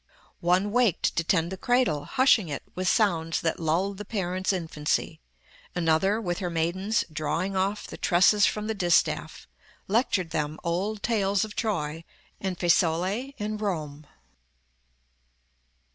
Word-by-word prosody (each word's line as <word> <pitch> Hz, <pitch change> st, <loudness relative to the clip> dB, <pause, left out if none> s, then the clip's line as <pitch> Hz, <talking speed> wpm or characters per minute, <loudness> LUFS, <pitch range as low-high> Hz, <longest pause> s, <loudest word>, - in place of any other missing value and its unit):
One 185 Hz, +4 st, +2 dB
waked 230 Hz, -6 st, +2 dB
to 165 Hz, -, +2 dB
tend 170 Hz, 0 st, +1 dB
the 190 Hz, -, -5 dB
cradle, 245 Hz, -, +1 dB
hushing 255 Hz, -, +3 dB
it 145 Hz, -, -4 dB
With 185 Hz, 0 st, -3 dB
sounds 165 Hz, -6 st, +2 dB
that 165 Hz, -, -1 dB
lulled 180 Hz, +5 st, 0 dB
the -, -, -4 dB
parents' 190 Hz, -3 st, -1 dB
infancy; 160 Hz, -3 st, -2 dB, 0.6 s
Another, 175 Hz, +5 st, +2 dB
with 175 Hz, -5 st, -3 dB
her 180 Hz, -3 st, -2 dB
maidens, 185 Hz, +6 st, 0 dB
drawing 165 Hz, +5 st, -2 dB
off 195 Hz, +2 st, -1 dB
The -, -, -9 dB
tresses 200 Hz, +3 st, +4 dB
from 210 Hz, 0 st, -2 dB
the 220 Hz, -, -1 dB
distaff, 180 Hz, -4 st, 0 dB, 0.4 s
lectured 195 Hz, -5 st, +1 dB
them 155 Hz, -1 st, -2 dB
Old 195 Hz, +5 st, -2 dB
tales 200 Hz, -3 st, +1 dB
of 215 Hz, -, -11 dB
Troy, 165 Hz, -8 st, -2 dB, 0.4 s
and 190 Hz, -2 st, -3 dB
Fesole, 185 Hz, +10 st, +1 dB
and 210 Hz, 0 st, -4 dB
Rome." 155 Hz, -7 st, -4 dB
185 Hz, 135 wpm, -26 LUFS, 165-210 Hz, 0.6 s, tresses